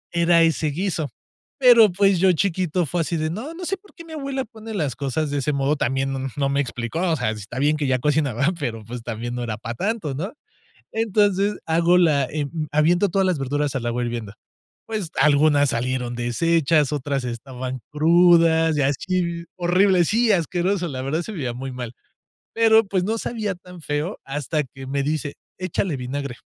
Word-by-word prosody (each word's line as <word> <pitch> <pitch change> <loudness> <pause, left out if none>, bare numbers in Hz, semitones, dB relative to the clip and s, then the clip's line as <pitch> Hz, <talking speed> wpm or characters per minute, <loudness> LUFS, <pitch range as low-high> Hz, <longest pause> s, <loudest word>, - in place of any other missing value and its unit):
Era 170 0 +4
ese 165 -1 +1
guiso. 165 -1 -2 0.5
Pero, 235 -5 +7
pues, 195 0 +3
yo 190 +1 +5
chiquito 180 -1 0
fue 170 +4 -1
así 165 +1 -1
de: 155 0 -1
"No, 255 - -5
no 360 +1 -6
sé 390 +3 -1
por 400 +1 -22
qué 335 - -11
mi 325 - -11
abuela 275 -3 -3
pone 220 -1 -10
las 145 - -1
cosas 140 +3 -2
de 145 - 0
ese 145 +2 -1
modo", 140 +2 +1
también 135 0 -1
no, 135 - -3
mm, 135 - -3
no 140 -1 0
me 140 +1 0
explicó, 120 +2 -4
o 170 -3 +2
sea, 125 -5 -1
está 105 +2 -8
bien 150 +3 +2
que 145 -2 -1
ya 130 - +2
cocinaba, 140 -1 +1
pero, 115 -6 -4
pues, 120 +1 -7
también 120 +1 -5
no 125 - -3
era 110 -3 -3
para 120 +2 -5
tanto, 195 - -2
¿no? 180 - -4 0.6
Entonces 205 -2 +1
hago 170 +2 +3
la, 150 -6 +3
eh, 145 +2 -3
mm, 155 +1 -4
aviento 170 +6 +3
todas 190 +1 +1
las 180 -4 +1
verduras 145 +1 -1
al 125 -3 -2
agua 120 +1 -1
hirviendo. 115 -4 -4 0.5
Pues 210 -7 -4
algunas 145 -1 +4
salieron 125 0 -2
deshechas, 150 +5 +1
otras 140 -2 -2
estaban 125 +1 -5
crudas 165 0 +4
y 145 - +2
así, 170 +4 -1
horribles. 180 0 +3
Sí, 230 +1 +2
asqueroso, 175 +1 0
la 130 -4 -5
verdad 155 +5 -1
se 220 - -7
veía 130 - -3
muy 130 +2 -6
mal, 120 -2 -6 0.6
pero 225 -1 +5
pues 190 -2 0
no 220 +4 0
sabía 215 -5 -3
tan 180 -1 -13
feo 150 +7 -2
hasta 145 +2 -2
que 135 0 -11
me 140 +1 -1
dice: 150 0 -2 0.2
"Échale 185 -3 -2
vinagre". 130 +1 -4
155 Hz, 195 wpm, -22 LUFS, 135-185 Hz, 0.6 s, Pero